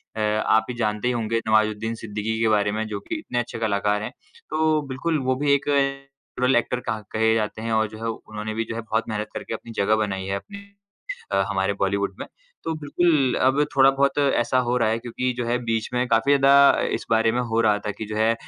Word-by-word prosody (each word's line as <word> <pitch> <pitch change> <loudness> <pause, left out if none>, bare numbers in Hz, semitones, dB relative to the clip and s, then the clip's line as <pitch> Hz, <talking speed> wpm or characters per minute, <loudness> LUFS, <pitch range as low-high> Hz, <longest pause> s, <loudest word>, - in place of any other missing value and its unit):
अ, - - -5 0.3
आप 110 0 +3
ये 125 - -4
जानते 105 0 -1
ही 125 - +1
होंगे 115 -1 -1
नवाज़ुद्दीन 110 +1 +1
सिद्दीकी 110 +1 -3
के 115 - +3
बारे 105 -1 +2
में 110 +1 -2
जो 105 -2 -4
कि - - -1
इतने 120 - -3
अच्छे 120 -1 -4
कलाकार 105 -1 0
हैं। - - -5 0.4
तो 155 -1 +2
बिल्कुल, 155 +5 -1
वो 130 -1 0
भी 145 +2 +1
एक 140 0 0
नैचुरल 140 -2 -1
ऐक्टर 120 +1 0
कहा 110 -1 -2
कहे 110 0 +2
जाते 110 0 -2
हैं, 115 0 -3
और 110 0 +2
जो 110 - -10
है 115 - -1
उन्होंने 110 -1 -6
भी 115 +1 -1
जो 115 - -4
है 115 - -3
बहुत 110 0 -1
मेहनत 105 -1 -3
करके - - -6
अपनी 115 +1 -7
जगह 105 +2 +3
बनाई 95 -2 -4
है 95 +1 -2
अपनी 200 - -8 0.7
अ, - - +2
हमारे - - 0
बॉलीवुड - - 0
में। - - -5 0.4
तो 165 - -2
बिल्कुल, 145 -3 +2
अब 130 +3 +3
थोड़ा-बहुत 135 +1 +4
ऐसा 130 -3 +2
हो 120 - +1
रहा 115 -3 +2
है 110 - +1
क्योंकि 125 +2 -2
जो 120 - -2
है 120 +1 +1
बीच 115 -1 -1
में 125 +1 0
काफ़ी 115 +4 +2
ज़्यादा 140 +1 +6
अ, - - +2
इस - - -2
बारे 115 0 +3
में 120 - -1
हो 115 +1 +2
रहा 105 -2 +3
था - - 0
कि 110 - -5
जो 105 +1 -6
है 110 +1 +3
115 Hz, 235 wpm, -23 LUFS, 110-135 Hz, 0.7 s, ज़्यादा